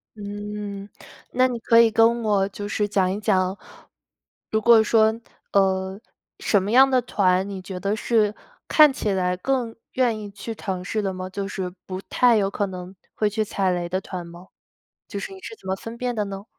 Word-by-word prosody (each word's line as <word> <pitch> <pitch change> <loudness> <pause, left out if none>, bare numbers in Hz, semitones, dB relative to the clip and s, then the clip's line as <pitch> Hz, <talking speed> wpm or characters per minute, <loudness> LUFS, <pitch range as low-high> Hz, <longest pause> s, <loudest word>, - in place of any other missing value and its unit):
嗯， 205 -1 -6 0.4
那 255 +1 +3
你 245 -2 -4
可 230 +1 +4
以 230 -1 +6
跟 230 +1 +3
我 200 -2 +2
就 205 +1 -6
是 210 0 0
讲 190 -3 +1
一 200 - -3
讲， 190 -2 +1 0.9
如 220 - +1
果 230 0 +6
说 220 0 +3 0.3
呃， 190 0 +1 0.4
什 205 - +2
么 200 +3 -3
样 265 +3 +7
的 260 -1 +3
团， 190 -5 +1
你 195 -2 -6
觉 185 0 -7
得 200 +2 -1
是 215 -1 +1 0.3
看 305 -2 +7
起 220 -5 -2
来 180 -1 0
更 245 +2 -1 0.2
愿 240 -4 +1
意 210 -1 -7
去 200 +3 -6
尝试 190 +1 -3
的 195 -2 -2
吗？ 185 0 -6
就 195 +1 -4
是 190 -2 -4 0.2
不 185 0 -5
太 245 -2 +4
有 195 -2 +1
可 205 +1 -1
能 185 0 -8 0.2
会 210 - +1
去 215 +1 -1
踩 195 -2 0
雷 175 -1 -2
的 185 +2 -2
团 180 -2 -6
吗？ 170 +2 -12 0.6
就 200 - -5
是 295 - -6
你 385 - -11
是 445 - -8
怎 410 - -14
么 190 - 0
分 225 +4 -8
辨 250 0 -2
的 210 -2 -1
呢？ 195 0 -6
205 Hz, 215 characters per minute, -23 LUFS, 190-225 Hz, 0.9 s, 样